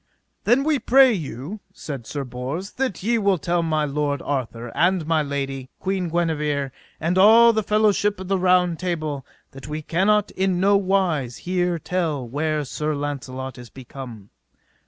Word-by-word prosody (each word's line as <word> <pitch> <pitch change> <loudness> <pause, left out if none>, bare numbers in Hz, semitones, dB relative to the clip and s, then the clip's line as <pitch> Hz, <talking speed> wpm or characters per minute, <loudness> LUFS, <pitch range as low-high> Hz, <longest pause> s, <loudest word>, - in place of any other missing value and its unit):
Then 245 +5 +4
we 300 -2 +1
pray 260 0 +6
you, 155 - -5 0.2
said 135 -6 -7
Sir 145 -2 -3
Bors, 135 - -5
that 255 -9 -3
ye 230 +2 +2
will 200 -3 +2
tell 170 +2 0
my 155 -2 0
lord 145 -1 -1
Arthur, 120 -4 -3
and 175 -1 +2
my 160 0 +2
lady, 135 -2 -4
Queen 190 -2 -1
Guenever, 150 -5 -1 0.3
and 170 +3 +1
all 230 +4 +7
the 220 - +1
fellowship 210 -1 +2
of 190 - -7
the 195 0 +1
Round 180 -2 +3
Table, 155 -6 -3 0.3
that 135 -1 -11
we 155 +1 -5
cannot 200 +6 +2
in 190 -1 0
no 200 +2 +4
wise 185 -10 +1
hear 180 -1 0
tell 160 -6 -2
where 150 +3 -1
Sir 150 +3 -2
Launcelot 130 -3 -5
is 120 -1 -11
become. 120 -4 -10
160 Hz, 160 wpm, -23 LUFS, 140-190 Hz, 0.3 s, all